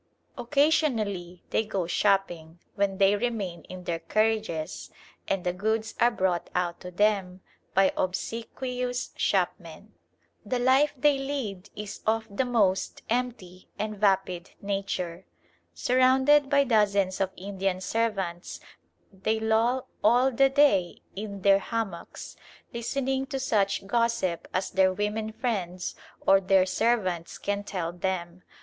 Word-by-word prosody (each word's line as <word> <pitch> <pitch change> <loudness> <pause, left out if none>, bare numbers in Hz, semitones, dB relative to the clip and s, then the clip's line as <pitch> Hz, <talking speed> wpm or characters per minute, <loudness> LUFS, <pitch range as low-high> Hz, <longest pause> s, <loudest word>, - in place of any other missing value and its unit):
Occasionally 235 - +1
they - - +2
go 195 -4 -2
shopping, 175 -3 0 0.2
when 200 -1 0
they 195 +1 +4
remain 205 -6 -2
in 185 0 -9
their 170 -1 -2
carriages, 215 -3 -1 0.4
and 195 -2 -1
the 180 - 0
goods 220 +4 -1
are 240 - +5
brought 185 -6 -1
out 175 -1 -1
to 180 - -8
them 190 -1 +1 0.3
by 195 0 +4
obsequious 245 +6 -3
shopmen. - - -1 0.5
The 255 - -1
life 260 +4 +3
they 285 +1 +3
lead 230 -9 -4
is 210 -1 -7
of 220 0 +2
the 260 - +1
most 200 -6 +1
empty 225 -7 -3
and 215 0 -3
vapid 190 -3 +1
nature. 195 -3 -3 0.5
Surrounded 265 +3 +4
by 280 0 +4
dozens 200 -6 +2
of 190 - +1
Indian 195 -1 -2
servants, 190 -4 -2 0.5
they 215 +4 -1
loll 225 +3 +1 0.2
all 255 +3 +4
the 270 +2 +4
day 270 -11 +3
in 200 -1 -6
their 195 0 +6
hammocks, 200 -6 -5 0.4
listening 265 +3 -1
to 270 -1 -3
such 200 -7 0
gossip 230 -5 0
as 185 0 -2
their 190 0 +4
women 210 +3 -2
friends 185 -7 -3 0.3
or 195 0 +6
their 190 0 +4
servants 185 -5 0
can 205 0 -2
tell 175 -4 -4
them. 180 -1 -3
205 Hz, 130 wpm, -27 LUFS, 185-235 Hz, 0.5 s, their